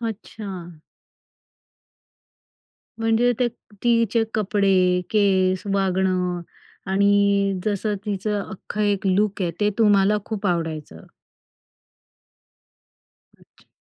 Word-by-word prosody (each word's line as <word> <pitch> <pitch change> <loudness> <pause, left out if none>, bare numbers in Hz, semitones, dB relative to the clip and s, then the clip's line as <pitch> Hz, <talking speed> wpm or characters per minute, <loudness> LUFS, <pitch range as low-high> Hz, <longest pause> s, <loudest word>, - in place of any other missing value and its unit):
अच्छा. 195 -7 -7 2.2
म्हणजे 225 +2 +2
ते 245 - +4 0.4
तिचे 230 -1 +3
कपडे, 190 -3 +2
केस, 190 -3 +2
वागणं 185 -2 0 0.5
आणि 200 0 +3
जसं 210 0 -1
तिचं 205 +1 -1
अख्खं 210 +2 -7
एक 205 -1 0
लूक 200 +1 +1
आहे, 175 - 0
ते 205 0 +3
तुम्हाला 205 -1 +4
खूप 210 -2 -4
आवडायचं. 160 - -3 2.3
अच्छा. - - -26
200 Hz, 85 wpm, -23 LUFS, 185-210 Hz, 2.3 s, ते